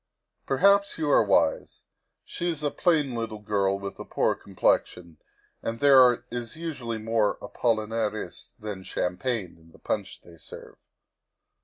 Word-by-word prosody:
Perhaps 200 Hz, +8 st, +3 dB
you 155 Hz, -3 st, 0 dB
are -, -, +6 dB
wise; 100 Hz, -2 st, +1 dB, 0.4 s
she 175 Hz, -, -3 dB
is 155 Hz, -3 st, -4 dB
a 145 Hz, -, 0 dB
plain 155 Hz, -7 st, +1 dB
little 115 Hz, -2 st, -4 dB
girl 100 Hz, -2 st, 0 dB
with 100 Hz, 0 st, -7 dB
a -, -, -5 dB
poor -, -, 0 dB
complexion, 90 Hz, -3 st, -1 dB, 0.4 s
and 115 Hz, 0 st, -4 dB
there 130 Hz, -4 st, +6 dB
is 120 Hz, -2 st, -5 dB
usually 140 Hz, -9 st, -4 dB
more 110 Hz, -1 st, 0 dB
apollinaris 110 Hz, -4 st, -2 dB
than 105 Hz, -3 st, -6 dB
champagne 95 Hz, 0 st, -3 dB
in 80 Hz, 0 st, -21 dB
the -, -, -16 dB
punch -, -, -4 dB
they 85 Hz, -1 st, -16 dB
serve." 75 Hz, -, -12 dB
115 Hz, 140 wpm, -26 LUFS, 100-135 Hz, 0.4 s, are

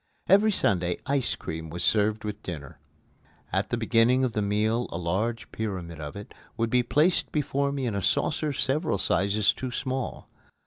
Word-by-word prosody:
Every 205 Hz, +4 st, +5 dB
Sunday 90 Hz, -, +1 dB
ice 135 Hz, -2 st, 0 dB
cream 80 Hz, 0 st, -6 dB
was 85 Hz, +2 st, -3 dB
served 105 Hz, +2 st, +2 dB
with 105 Hz, 0 st, -5 dB
dinner. 75 Hz, -7 st, -7 dB, 0.7 s
At -, -, 0 dB
the 120 Hz, -, 0 dB
beginning 115 Hz, +3 st, +3 dB
of 125 Hz, -3 st, 0 dB
the 105 Hz, -, 0 dB
meal 110 Hz, +4 st, +1 dB
a -, -, -3 dB
large 100 Hz, +7 st, -2 dB
pyramid 90 Hz, -7 st, -4 dB
of 75 Hz, -1 st, -6 dB
it 100 Hz, 0 st, -9 dB, 0.2 s
would 115 Hz, 0 st, 0 dB
be 125 Hz, -, +4 dB
placed 150 Hz, +8 st, +2 dB
before 140 Hz, -1 st, 0 dB
me 140 Hz, -2 st, -2 dB
in 115 Hz, -, -1 dB
a 100 Hz, -, -1 dB
saucer 150 Hz, -, +1 dB
several 135 Hz, -, 0 dB
sizes 100 Hz, +3 st, +2 dB
too 130 Hz, -, -5 dB
small. 130 Hz, 0 st, -3 dB
110 Hz, 175 wpm, -27 LUFS, 95-130 Hz, 0.7 s, Every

